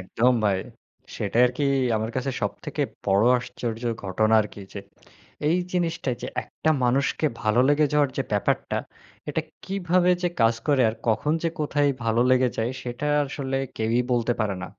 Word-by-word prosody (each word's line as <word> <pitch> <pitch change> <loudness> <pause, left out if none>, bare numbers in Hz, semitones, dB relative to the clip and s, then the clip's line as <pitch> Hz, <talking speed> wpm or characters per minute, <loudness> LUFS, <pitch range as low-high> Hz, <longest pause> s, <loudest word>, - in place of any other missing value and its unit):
একদম 115 +7 +2
ভাই। 100 -2 +2 0.6
সেটাই 110 +4 +1
আরকি 125 +4 -2 0.3
আমার 110 +1 -2
কাছে 130 +1 -1
সবথেকে - - -3 0.2
বড় 100 +2 +4
আশ্চর্যর 120 -1 -4
ঘটনা 110 +4 +2
আরকি 105 -1 -6
যে, 100 - -6 0.7
এই 170 - +3 0.2
জিনিসটা 170 -6 -1
যে, - - -4 0.2
একটা 160 - -2
মানুষকে 140 +5 +1 0.2
ভালো 110 +3 +3
লেগে 150 +1 +4
যাওয়ার 145 -2 +3
যে, 135 - +1
ব্যাপারটা, 100 - 0 0.5
এটা 155 +2 -1 0.2
কিভাবে 180 -2 +1
যে, 175 - +2
কাজ 115 0 +5
করে 140 -3 +4
আর - - -8
কখন 115 +7 +1
যে, 165 - +2
কোথায় 145 -1 +2
ভালো 115 +1 +2
লেগে 130 0 +4
যায়? 115 +3 -1
সেটা 120 +4 -4 0.2
আসলে 135 -1 -3 0.2
কেউই 115 +2 +1
বলতে 120 0 +2
পারে 100 -3 0
না। - - -3
125 Hz, 160 wpm, -25 LUFS, 110-145 Hz, 0.7 s, কাজ